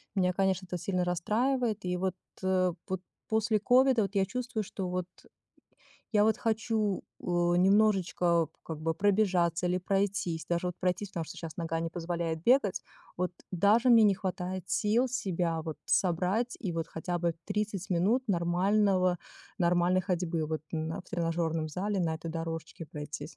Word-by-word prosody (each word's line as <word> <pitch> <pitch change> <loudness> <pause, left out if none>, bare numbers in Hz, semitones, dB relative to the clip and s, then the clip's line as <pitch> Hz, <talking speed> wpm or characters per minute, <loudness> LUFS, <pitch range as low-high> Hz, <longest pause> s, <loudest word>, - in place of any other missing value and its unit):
Меня, 180 -2 +3
конечно, 190 0 0
это 180 0 -4
сильно 180 +1 -1
расстраивает, 215 +6 0
и 180 0 -1
вот, 185 0 -1 0.3
э, 185 -1 +2 0.2
вот 190 -1 -3 0.3
после 220 0 +2
ковида 250 +1 +4
вот 200 +1 -4
я 195 -1 +3
чувствую, 235 +1 -3
что 190 -2 -5
вот 180 0 -2 1.1
я 210 -1 +5
вот 220 0 +3
хочу, 220 -2 0 0.2
э, - - -14
немножечко 175 -1 +3 0.2
как 160 -2 -6
бы 165 +1 0
пробежаться 180 -3 +2
или 180 +1 +1
пройтись, 185 -4 -1
даже 170 +1 0
вот 180 - -2
пройтись, 185 +2 -1
потому 170 - -3
что - - -10
щас 165 -2 -7
нога 165 -1 -2
не 165 0 -2
позволяет 165 -1 -3
бегать. 235 -3 +3 0.3
Вот 180 0 -1 0.2
даже 210 +7 +4
мне 230 -2 +8
не 205 -2 +5
хватает 185 -1 -3
сил 225 +5 +2
себя 175 -9 -1
вот 160 -1 -5
собрать 190 +7 +1
и 190 -7 -3
вот 165 0 -3
хотя 175 +2 -3
бы 170 -1 0
30 205 -2 -3
минут 200 +9 +2
нормального 185 0 +2 0.4
нормальной 175 0 +3
ходьбы 175 -3 -1
вот 155 -1 -3
на 160 +2 -2
в - - -17
тренажёрном 165 -2 -1
зале 195 +5 -2
на 165 -2 0
этой 165 +1 -7
дорожке 165 0 -5
пройтись. 150 +2 -7
180 Hz, 160 wpm, -30 LUFS, 170-205 Hz, 1.1 s, мне